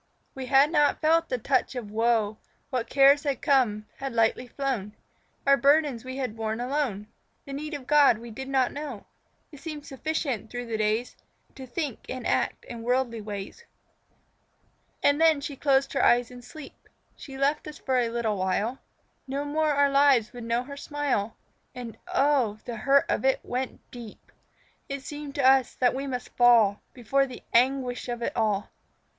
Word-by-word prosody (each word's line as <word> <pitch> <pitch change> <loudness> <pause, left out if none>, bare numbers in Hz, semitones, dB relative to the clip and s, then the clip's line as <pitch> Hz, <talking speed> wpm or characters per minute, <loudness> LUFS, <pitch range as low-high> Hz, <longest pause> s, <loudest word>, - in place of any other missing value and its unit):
We 265 -1 -6
had 275 +3 +5
not 295 -3 +3
felt 325 +2 +2
the 255 - 0
touch 260 +2 0
of 225 -5 -6
woe; 220 -1 +1 0.3
What 250 -3 -2
cares 275 +1 +6
had 280 -4 -2
come, 245 -8 +2
had 270 -2 -5
lightly 230 +2 +1
flown; 245 -6 -3 0.5
Our 275 0 +5
burdens 280 -2 +3
we 260 +1 -6
had 255 -5 -3
borne 220 0 -3
alone 250 -5 -2 0.4
The 275 - -8
need 300 +2 -5
of 275 -3 -8
God 290 -5 +5
we 235 +1 -10
did 265 +4 -7
not 265 -2 +2
know. 285 -7 -6 0.5
It 290 - -12
seemed 300 -1 -7
sufficient 270 - -3
through 245 0 -5
the 225 -2 -3
days 215 +3 -1 0.4
To 260 -1 -10
think 275 -1 -4
and 255 -1 -5
act - - 0
in 235 -1 -8
worldly 240 -1 0
ways. 205 - -7 1.4
And 285 +2 +3
then 320 -2 +5
she 280 0 -6
closed 270 -1 +1
her - - +1
eyes 240 0 +3
in 245 0 -11
sleep; 305 +2 -13 0.3
She 270 -2 -10
left 280 +3 0
us 300 - -8
for 260 -1 0
a 235 -2 +1
little 230 -3 -1
while; 200 +7 -1 0.5
No 275 +2 -3
more 310 +1 0
our 285 0 +3
lives 275 -5 +4
would 240 -2 -8
know 235 +1 0
her 280 +2 -9
smile. 280 -8 -2 0.4
And 245 -3 -7 0.2
oh, 275 - +2
the 235 -1 -5
hurt 275 +5 +3
of - - -1
it 265 0 +3
went 255 +1 -4
deep! 235 -3 -11 0.6
It 275 -1 -5
seemed 290 -1 -7
to 275 -2 +3
us 265 -1 +4
that 250 -1 +2
we 270 +2 -4
must 250 -2 -5
fall 230 -4 +5
Before 270 +3 0
the 255 - -10
anguish 250 0 +1
of 240 -1 -4
it - - -3
all. 210 -3 0
260 Hz, 180 wpm, -27 LUFS, 230-280 Hz, 1.4 s, cares